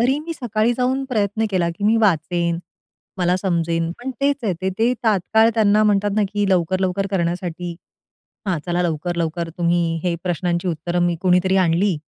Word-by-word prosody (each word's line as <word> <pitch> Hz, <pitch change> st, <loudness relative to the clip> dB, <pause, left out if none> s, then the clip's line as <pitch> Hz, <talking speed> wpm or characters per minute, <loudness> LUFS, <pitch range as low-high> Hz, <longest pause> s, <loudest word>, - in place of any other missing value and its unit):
तरी 260 Hz, +4 st, +2 dB
मी 330 Hz, +2 st, -5 dB
सकाळी 230 Hz, -3 st, 0 dB
जाऊन 260 Hz, +2 st, 0 dB
प्रयत्न 215 Hz, -2 st, 0 dB
केला, 180 Hz, -3 st, +1 dB
की 170 Hz, +5 st, -6 dB
मी 220 Hz, +2 st, +4 dB
वाचेन, 170 Hz, -4 st, +1 dB, 0.6 s
मला 180 Hz, 0 st, +2 dB
समजेन 170 Hz, -3 st, -1 dB
पण 250 Hz, +2 st, -5 dB
तेच 280 Hz, 0 st, +2 dB
आहे 200 Hz, -, +1 dB
ते, 190 Hz, -, -1 dB
ते 235 Hz, +2 st, +3 dB
तात्काळ 220 Hz, +2 st, +3 dB
त्यांना 215 Hz, -1 st, +4 dB
म्हणतात 205 Hz, 0 st, +2 dB
ना, 215 Hz, -, +3 dB
की 205 Hz, -1 st, 0 dB
लवकर-लवकर 185 Hz, +2 st, +1 dB
करण्यासाठी, 175 Hz, -1 st, -2 dB, 0.7 s
हा 185 Hz, -3 st, +1 dB
चला 175 Hz, 0 st, 0 dB
लवकर-लवकर 170 Hz, 0 st, -2 dB
तुम्ही 170 Hz, -1 st, +1 dB
हे 175 Hz, -2 st, 0 dB
प्रश्नांची 175 Hz, 0 st, -1 dB
उत्तरं 175 Hz, +1 st, -2 dB
मी 175 Hz, -1 st, +1 dB
कोणीतरी 185 Hz, +1 st, +3 dB
आणली 180 Hz, +1 st, +2 dB
185 Hz, 165 wpm, -21 LUFS, 170-210 Hz, 0.7 s, मी